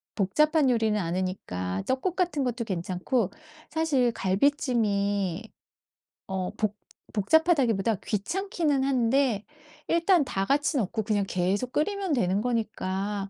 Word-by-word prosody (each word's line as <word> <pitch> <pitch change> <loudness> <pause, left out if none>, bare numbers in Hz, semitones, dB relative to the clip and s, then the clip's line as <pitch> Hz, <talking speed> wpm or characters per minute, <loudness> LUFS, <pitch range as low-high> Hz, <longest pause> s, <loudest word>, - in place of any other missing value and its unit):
복잡한 300 - +3
요리는 220 -3 +2
아니니까 165 - -3
떡국 295 +8 0
같은 345 -7 0
것도 240 -1 -2
괜찮고 185 +3 -1 0.4
사실 290 -7 +1
갈비찜이 205 - 0 0.8
어 190 -1 -3
복 215 -1 0 0.4
복잡하다기보다 230 - +3
귀찮기는 300 - -1
한데 255 -4 +1 0.4
일단 335 -2 +3
다 195 -6 -2
같이 290 +6 +1
넣고 220 -1 -1
그냥 205 -1 +1
계속 190 +8 -1
끓이면 390 +5 -1
되는 200 -7 +1
거니까 205 -4 -2
225 Hz, 265 characters per minute, -27 LUFS, 195-285 Hz, 0.8 s, 복잡한